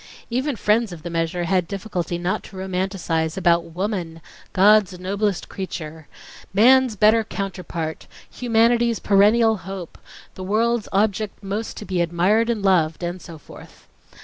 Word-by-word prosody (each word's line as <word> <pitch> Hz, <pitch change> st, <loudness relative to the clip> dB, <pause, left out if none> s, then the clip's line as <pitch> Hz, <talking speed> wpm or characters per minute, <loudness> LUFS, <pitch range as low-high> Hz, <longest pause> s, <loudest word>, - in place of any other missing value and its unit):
Even 260 Hz, +3 st, -1 dB
friends 215 Hz, 0 st, +1 dB
of 170 Hz, -3 st, -10 dB
the 175 Hz, -, -5 dB
measure 165 Hz, +1 st, -1 dB
had 180 Hz, 0 st, +1 dB
difficulty 180 Hz, -4 st, -4 dB
not 175 Hz, +2 st, -2 dB
to 195 Hz, -, -14 dB
romanticize 185 Hz, -4 st, -2 dB
about 170 Hz, -2 st, +2 dB
"Woman—God's 185 Hz, +2 st, 0 dB
noblest 200 Hz, +1 st, -2 dB
creature"... 160 Hz, -5 st, -7 dB, 0.5 s
"man's 255 Hz, +2 st, +5 dB
better 215 Hz, +2 st, +4 dB
counterpart"... 180 Hz, -6 st, -5 dB, 0.2 s
"humanity's 235 Hz, -1 st, +2 dB
perennial 215 Hz, +3 st, +4 dB
hope"... 190 Hz, -1 st, -8 dB, 0.3 s
"the 185 Hz, -, -8 dB
world's 225 Hz, +3 st, 0 dB
object 205 Hz, +1 st, -1 dB
most 205 Hz, +3 st, -4 dB
to 210 Hz, -, -7 dB
be 185 Hz, -3 st, -1 dB
admired 180 Hz, +7 st, +2 dB
and 220 Hz, -4 st, -1 dB
loved"... 175 Hz, -4 st, +2 dB
and 175 Hz, +1 st, -4 dB
so 165 Hz, -3 st, -10 dB
forth. 150 Hz, -, -15 dB
195 Hz, 135 wpm, -22 LUFS, 175-215 Hz, 0.5 s, man's